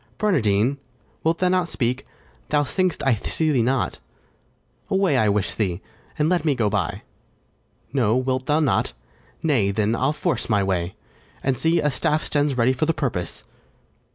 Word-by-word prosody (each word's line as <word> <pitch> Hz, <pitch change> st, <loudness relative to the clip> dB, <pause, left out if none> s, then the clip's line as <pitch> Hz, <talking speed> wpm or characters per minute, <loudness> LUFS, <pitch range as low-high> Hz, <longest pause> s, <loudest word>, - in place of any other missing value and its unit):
Barnardine! 130 Hz, -, +2 dB, 0.4 s
Wilt 165 Hz, +1 st, +2 dB
thou 185 Hz, -, +2 dB
not 180 Hz, -1 st, +2 dB
speak? 125 Hz, 0 st, -1 dB, 0.4 s
thou 145 Hz, -1 st, +3 dB
think'st 185 Hz, +5 st, -1 dB
I 135 Hz, -, +4 dB
see 155 Hz, +8 st, 0 dB
thee 130 Hz, -5 st, +3 dB
not; 130 Hz, +3 st, 0 dB, 0.9 s
Away, 190 Hz, -6 st, +2 dB
I'd 110 Hz, -5 st, +3 dB
wish 100 Hz, -1 st, 0 dB
thee, 95 Hz, -5 st, -1 dB, 0.4 s
and 150 Hz, -, +2 dB
let 175 Hz, -2 st, +1 dB
me 150 Hz, -4 st, +2 dB
go 110 Hz, -4 st, +1 dB
by: 105 Hz, -, -2 dB, 0.9 s
No, 115 Hz, -5 st, +2 dB
wilt 130 Hz, 0 st, -1 dB
thou 150 Hz, +1 st, +3 dB
not? 140 Hz, -, +1 dB, 0.5 s
nay, 130 Hz, -11 st, +2 dB
then, 105 Hz, +2 st, +1 dB
I'll 130 Hz, +4 st, +1 dB
force 155 Hz, -2 st, -2 dB
my 105 Hz, -3 st, +3 dB
way; 90 Hz, -2 st, -1 dB, 0.5 s
And, 135 Hz, -1 st, +1 dB
see, 165 Hz, +5 st, +2 dB
a 150 Hz, -, +1 dB
staff 150 Hz, +4 st, 0 dB
stands 145 Hz, -2 st, 0 dB
ready 125 Hz, +2 st, +3 dB
for 140 Hz, +4 st, -1 dB
the 165 Hz, -, +1 dB
purpose. 110 Hz, -, -3 dB
130 Hz, 165 wpm, -23 LUFS, 110-155 Hz, 0.9 s, I